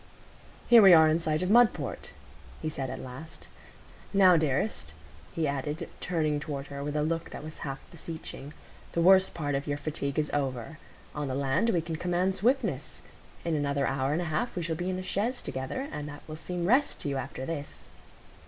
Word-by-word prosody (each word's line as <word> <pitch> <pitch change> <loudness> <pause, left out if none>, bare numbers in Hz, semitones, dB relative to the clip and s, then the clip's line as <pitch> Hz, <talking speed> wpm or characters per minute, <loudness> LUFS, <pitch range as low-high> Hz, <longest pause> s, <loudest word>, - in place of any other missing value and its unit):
"Here 235 -2 +9
we 190 -4 +9
are 160 -1 +7
in 155 +1 +3
sight 155 0 0
of 185 - 0
Mudport," 240 0 +3 0.5
he 155 - -2
said 135 -4 -4
at - - -5
last. 130 +6 -10 0.7
"Now, 185 -2 +7
dearest," 155 +6 0 0.4
he 165 -3 -1
added, 150 +4 -3
turning 155 -4 0
toward 140 -2 -5
her 140 0 -4
with 145 +1 -3
a 150 - +1
look 165 +1 -2
that - - -8
was 155 0 -9
half 135 -1 -4
beseeching, 160 -3 -8 0.4
"the 170 - +1
worst 190 +1 +6
part 145 -3 -2
of 140 +2 -2
your 145 0 -1
fatigue 145 -1 -3
is 150 -1 0
over. 135 0 -2 0.3
On 150 -1 -3
the 130 - -2
land 140 +11 +1
we 175 -7 +2
can 160 -1 -4
command 180 +2 0
swiftness. 255 +7 0 0.4
In 170 - 0
another 140 -1 0
hour 135 +1 0
and 165 +4 0
a 160 -2 -4
half 235 +10 -1
we 175 - -2
shall 165 -1 -1
be 175 +3 -3
in 185 - -1
a 185 - -4
chaise 210 +7 -1
together, 130 - -3
and 150 0 -5
that 145 0 -10
will 155 - -6
seem 175 +2 -4
rest 260 +9 +2
to 145 - -2
you 140 - -1
after 130 0 -5
this." 145 -2 -6
155 Hz, 200 wpm, -29 LUFS, 140-180 Hz, 0.7 s, Here